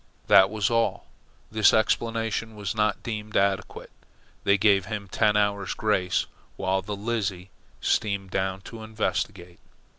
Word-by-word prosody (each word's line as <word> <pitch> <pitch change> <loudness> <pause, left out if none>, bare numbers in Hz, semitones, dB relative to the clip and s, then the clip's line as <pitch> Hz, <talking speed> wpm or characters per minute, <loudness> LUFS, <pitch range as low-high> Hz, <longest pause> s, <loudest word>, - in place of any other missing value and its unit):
That 95 0 +6
was 105 0 -1
all. 115 0 0 0.5
This 110 -1 +5
explanation 115 0 0
was 100 -4 -3
not 105 -1 0
deemed 110 -2 -4
adequate. 100 0 -1 0.5
They 100 0 +4
gave 100 -2 +3
him 100 0 -5
ten 105 +2 +2
hours' 100 -1 0
grace 95 -4 +1 0.3
while 95 +1 0
the 105 +2 -5
Lizzie 100 -4 -3 0.3
steamed 100 -3 0
down 95 0 -1
to 110 +3 -10
investigate. 100 -5 -3
105 Hz, 130 wpm, -26 LUFS, 95-110 Hz, 0.5 s, That